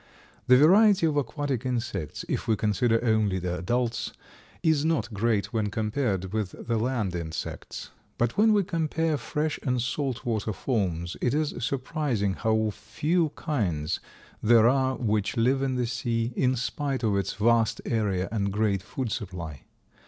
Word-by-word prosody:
The 125 0 +8
variety 190 - +6
of 155 -2 +1
aquatic 145 -2 -1
insects, 120 - -3
if - - -2
we 110 - +3
consider 115 +3 +1
only 110 -4 +2
the 90 0 -2
adults, 120 +6 -1 0.5
is 160 -3 +3
not 160 -7 0
great 105 0 0
when 110 -2 +1
compared 105 -3 -1
with 105 -4 -2
the 115 -2 0
land 115 -5 -1
insects. 80 -2 -5 0.3
But 120 -1 0
when 220 +2 +5
we 205 -2 +4
compare 165 -3 0
fresh 150 +2 -2
and 125 -2 0
salt 130 +1 -2
water 110 -2 -1
forms 90 -7 -2
it 125 +2 +1
is 155 -1 0
surprising 130 - -1
how 110 0 +1
few 160 - 0
kinds 90 - -1 0.4
there 115 0 +6
are 130 +1 +2
which 105 -2 -1
live 130 +4 +3
in 135 -1 0
the 125 -1 0
sea, 115 0 -1
in 130 0 +2
spite 135 +2 -2
of 105 -3 +2
its 100 - -1
vast 115 +1 +2
area 100 -5 0
and 100 -3 0
great 105 -2 +1
food 125 +4 -4
supply. 90 -9 -5
115 Hz, 155 wpm, -27 LUFS, 105-135 Hz, 0.5 s, The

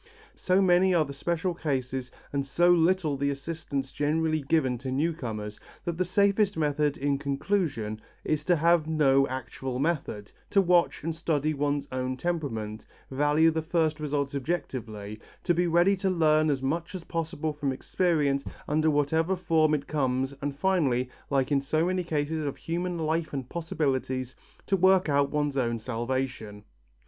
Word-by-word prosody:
So 190 +1 +2
many 180 0 +4
are 160 -2 +3
the 140 - -7
special 170 +5 -1
cases, 130 -5 -2 0.2
and 140 -1 0
so 175 +6 +3
little 170 -3 +3
the 140 +1 0
assistance 140 -1 -4
generally 155 +1 0
given 135 -4 +1
to 130 +1 -5
new 155 +6 +1
comers, 110 -8 -6 0.3
that 170 - -2
the - - +4
safest 200 +1 +2
method 150 -1 +1
in 140 0 0
conclusion 140 - -1 0.2
is 150 -1 0
to 180 - +4
have 165 0 +3
no 135 -4 +3
actual 130 0 -5
method, 135 -9 -2 0.2
to 200 - +3
watch 175 -4 +3
and 165 +1 -1
study 155 -2 0
one's 145 0 -1
own 130 0 -2
temperament, 125 -10 -3 0.2
value 150 +4 +3
the 160 0 -1
first 160 -1 0
results 145 -2 -2
objectively, 120 -9 -4 0.2
to 175 - +2
be 175 +1 +1
ready 175 +4 +4
to 190 +1 0
learn 155 -3 +3
as 135 -2 0
much 165 +7 -2
as 180 - -6
possible 160 -2 -3
from 145 -2 -2
experience 145 -1 0 0.2
under 155 +1 +2
whatever 160 +5 +1
form 160 -3 +2
it 140 -1 -4
comes 135 -2 0
and 140 0 -3
finally, 140 -8 +1 0.2
like 135 0 +1
in 140 -1 +3
so 155 +4 +1
many 185 0 0
cases 155 -1 -1
of 140 -2 -3
human 175 +1 -3
life 160 0 -1
and 135 -3 -4
possibilities, 130 -6 -2 0.3
to 195 - +2
work 185 -2 +4
out 140 -1 +3
one's 145 -1 -1
own 120 -3 +1
salvation. 120 -2 -3
150 Hz, 165 wpm, -28 LUFS, 135-170 Hz, 0.3 s, many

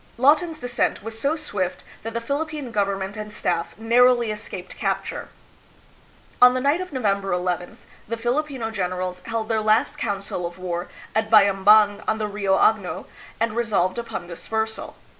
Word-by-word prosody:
Lawton's 310 +5 +3
descent 245 -6 -1
was 225 0 -5
so 280 +6 +1
swift 205 - -3 0.2
that 225 +1 -6
the - - +1
Philip 285 +7 -2
pine 295 -6 -6
government 200 -2 -1
and 210 0 -6
staff 170 -4 -2
narrowly 240 +1 +4
escaped 210 -4 -6
capture. - - -3 1.1
On 250 0 +8
the - - +1
night 285 +7 +2
of 370 - -6
November 200 -7 0
llth, 180 0 -2 0.3
the 230 +2 -3
Filipino 245 0 -1
generals 180 -2 -3
held 225 -1 -2
their 220 -1 +1
last 215 +6 +2
council 195 -4 -3
of 175 - -11
war 175 -1 -4 0.2
at 220 0 0
Bayambang 205 0 +6
on 220 - +1
the 215 - -1
Rio 200 -2 +1
Agno, 210 -5 +2 0.3
and 225 -1 0
resolved 215 -4 +1
upon 230 -6 -5
dispersal. 220 +6 -4
220 Hz, 160 wpm, -23 LUFS, 195-240 Hz, 1.1 s, On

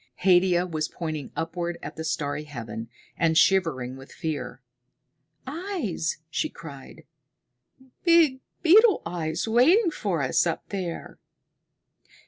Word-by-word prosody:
Haidia 180 -1 +4
was 155 -3 -2
pointing 155 -4 -5
upward 170 +1 -3
at - - -7
the 160 - -5
starry 150 -1 -2
heaven, 115 -5 -7 0.3
and 160 -1 +2
shivering 155 -11 +2
with 135 +1 -13
fear. 160 -4 -5 0.8
"Eyes!" 290 - -3
she 310 - -1
cried. 140 - -11 1.0
"Big 335 -6 +5 0.2
beetles 325 - +3
waiting 325 - +4
for 185 - -2
us 135 +6 +2
up 165 - -3
there!" 185 -4 -5
170 Hz, 110 wpm, -26 LUFS, 155-245 Hz, 1.0 s, Big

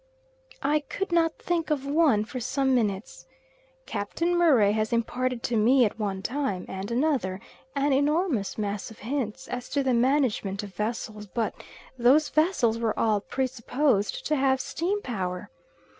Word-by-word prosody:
I 295 +2 +3
could 380 +6 -5
not 330 -1 +2
think 340 -2 -1
of 285 -3 0
one 280 -7 +3
for 255 - -6
some 265 +2 0
minutes. 210 -4 -1 0.6
Captain 280 +12 -1
Murray 275 -13 +5
has 215 0 0
imparted 245 +1 -1
to 235 - -1
me 240 +4 +5
at 215 - -3
one 195 -2 -2
time 255 -8 -2
and 190 +1 -5
another 240 -7 0 0.4
an 280 0 +2
enormous 290 - +1
mass 205 -2 -3
of 220 - -13
hints 260 0 -3
as 250 0 -5
to 280 - 0
the 260 -1 +1
management 235 -6 +1
of 200 -2 -9
vessels, 210 +1 -4
but 225 +3 -2 0.5
those 270 +6 +5
vessels 300 -9 +2
were 225 -2 -1
all 215 -2 +2
pre 265 +5 -1
supposed 250 -3 0
to 305 - +1
have 265 -1 +2
steam 380 +9 -2
power. 185 -7 -4
250 Hz, 160 wpm, -27 LUFS, 210-290 Hz, 0.6 s, Murray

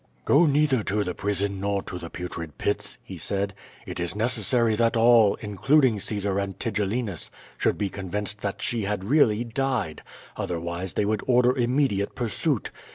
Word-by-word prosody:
"Go 160 +4 +5
neither 145 -4 +3
to 105 0 0
the 90 - -3
prison 100 0 -2
nor 100 0 -1
to 90 -2 -6
the 85 - -7
Tutrid 85 -4 -6
Pits,' - - -1
" - - -37
he - - -9
said. 100 0 -1 0.3
"It - - -6
is 85 +2 -2
necessary 115 0 +1
that 115 +1 +2
all, 115 -3 +6
including 120 +3 +3
Caesar 100 -1 -1
and 100 -1 -3
Tigellinus, 105 -3 -2 0.3
should - - +1
be 100 - -1
convinced 100 +1 -4
that 100 - -3
she 115 -4 -1
had 100 -1 -2
really 115 -2 +3
died, 120 - -2 0.3
otherwise 85 +1 -4
they 105 - +1
would 105 0 0
order 125 0 +4
immediate 120 -5 +1
pursuit. 125 - -1
105 Hz, 165 wpm, -25 LUFS, 100-120 Hz, 0.3 s, all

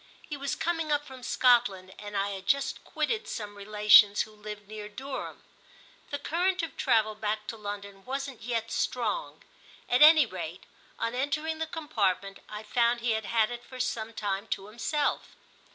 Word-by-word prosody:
He 300 - -4
was 280 -1 -2
coming 325 -2 -1
up 295 0 +1
from 260 -2 -11
Scotland 235 -7 +3
and 205 -1 -5
I 200 +1 +1
had 195 -1 -7
just 280 0 +1
quitted 450 -1 -2
some 205 -2 -5
relations 210 0 +6
who 215 - -13
lived 210 -1 -9
near 210 0 -7
Durham. 265 +5 -6 0.7
The 285 - -2
current 355 +5 0
of 325 - -5
travel 220 -5 +2
back 215 0 -2
to - - -4
London 200 -2 -7
wasn't 270 0 -4
yet 230 0 -2
strong; 255 - -2 0.4
at 245 - +2
any 310 +1 +9
rate - - -6 0.3
on 230 - -2
entering 305 +5 -1
the 320 - -1
compartment 200 - -1
I 210 +1 -6
found 235 +2 +2
he 235 0 +1
had 220 -1 -1
had 225 0 +2
it 240 0 -6
for 255 - -11
some 225 -3 -2
time 205 -1 -3
to 195 - -3
himself. 240 +8 -2
230 Hz, 170 wpm, -29 LUFS, 210-280 Hz, 0.7 s, any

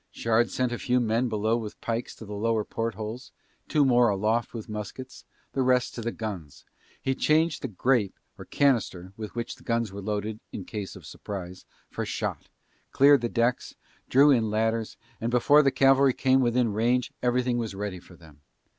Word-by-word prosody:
Shard 115 -1 +1
sent 125 +5 -1
a 120 - -3
few 125 0 +1
men 120 +1 +1
below 110 +1 +1
with 110 -3 -7
pikes 115 +1 -3
to 110 - -11
the 105 - -8
lower 110 +1 0
port 115 -2 -3
holes, 110 +4 -7 0.4
two 150 -3 +3
more 120 -2 +4
aloft 110 +4 0
with 115 -3 -7
muskets, 110 +5 -7 0.3
the 135 - 0
rest 125 -1 +2
to 120 - -6
the 115 +1 -2
guns, 95 -12 -7 0.3
he 135 - -1
changed 155 +4 +2
the - - -2
"grape" 110 0 0 0.2
or - - -11
"canister" 105 -9 0
with 110 0 -8
which 120 -1 -4
the - - -18
guns 115 -3 -1
were 100 +1 -7
loaded 105 +1 -3
in 95 - -6
case 105 -3 -6
of - - -12
surprise, 95 -3 -8 0.3
for - - -3
shot, - - -4 0.4
cleared 140 -1 +6
the 120 - -1
decks, 120 +2 0 0.3
drew 140 +3 +6
in 115 -5 +2
ladders, 110 +1 -1 0.2
and 115 - -1
before 125 +5 +5
the 140 - +3
cavalry 135 0 +4
came 130 0 +3
within 120 -2 +1
range 120 +3 +1
everything 125 0 +1
was 110 -4 -4
ready 100 -2 -4
for 90 - -17
them. 80 -4 -18
115 Hz, 190 wpm, -27 LUFS, 105-125 Hz, 0.4 s, cleared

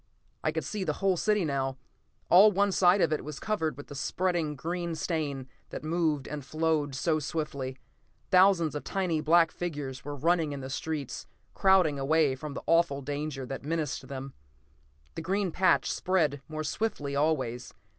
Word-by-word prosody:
I - - +1
could - - -2
see 210 -3 -3
the - - -1
whole 195 -2 +2
city 210 +1 +1
now. 135 -2 -1 0.5
All 200 +4 +8
one 200 +1 +2
side 185 +1 +4
of 160 - +3
it 155 - -2
was 150 -2 -7
covered 160 - -1
with 145 - -8
the - - -10
spreading 170 +1 -1
green 170 +3 -3
stain 150 -5 -2 0.2
that - - -7
moved 155 -3 0
and 150 -1 -5
flowed 155 -1 0
so 155 +3 +1
swiftly. 140 -4 -4 0.5
Thousands 185 -4 +5
of 150 - -4
tiny 180 -5 -1
black 165 +1 +4
figures 145 -6 -5
were 145 0 -5
running 160 +1 +1
in 140 - -5
the 130 0 -6
streets, 150 -1 -4 0.3
crowding 185 -7 +4
away 150 0 +3
from 145 +2 -7
the - - -6
awful 165 -5 +2
danger 145 -1 -4
that 135 +1 -6
menaced 155 -1 -2
them. 135 0 -6 0.8
The - - -5
green 190 +2 0
patch 185 +3 +3
spread 155 -7 +1
more 155 0 -4
swiftly 145 -5 -2
always. 130 -5 0
155 Hz, 170 wpm, -29 LUFS, 140-175 Hz, 0.8 s, All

